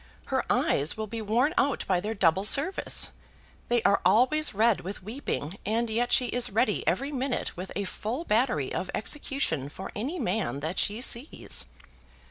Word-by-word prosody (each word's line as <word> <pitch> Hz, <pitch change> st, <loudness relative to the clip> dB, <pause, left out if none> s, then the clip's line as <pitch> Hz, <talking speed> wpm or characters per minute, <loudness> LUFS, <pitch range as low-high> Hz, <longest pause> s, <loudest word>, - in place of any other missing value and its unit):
Her -, -, +2 dB
eyes 145 Hz, +7 st, +2 dB
will 220 Hz, -, -2 dB
be 225 Hz, +2 st, -5 dB
worn 235 Hz, +9 st, +2 dB
out 275 Hz, -1 st, +1 dB
by 185 Hz, -2 st, +2 dB
their 215 Hz, +4 st, -3 dB
double 190 Hz, -1 st, +3 dB
service. 280 Hz, -, +3 dB, 0.6 s
They 240 Hz, -1 st, +2 dB
are 200 Hz, -, +3 dB
always 255 Hz, +11 st, +3 dB
red 220 Hz, +1 st, +2 dB
with 190 Hz, +1 st, -7 dB
weeping, 200 Hz, -, -4 dB
and 225 Hz, +2 st, 0 dB
yet 240 Hz, +2 st, 0 dB
she 250 Hz, -, +4 dB
is 245 Hz, +1 st, +1 dB
ready 210 Hz, +1 st, +1 dB
every 260 Hz, -, 0 dB
minute 265 Hz, -1 st, -2 dB
with 185 Hz, +2 st, -7 dB
a 200 Hz, -, -1 dB
full 225 Hz, -, -4 dB
battery 215 Hz, -, +1 dB
of 185 Hz, -, -3 dB
execution 215 Hz, -, -2 dB
for 190 Hz, +6 st, -8 dB
any 270 Hz, +12 st, -3 dB
man 200 Hz, -, -1 dB
that 160 Hz, +5 st, -2 dB
she 210 Hz, +3 st, 0 dB
sees." 255 Hz, +3 st, 0 dB
220 Hz, 170 wpm, -28 LUFS, 190-255 Hz, 0.6 s, she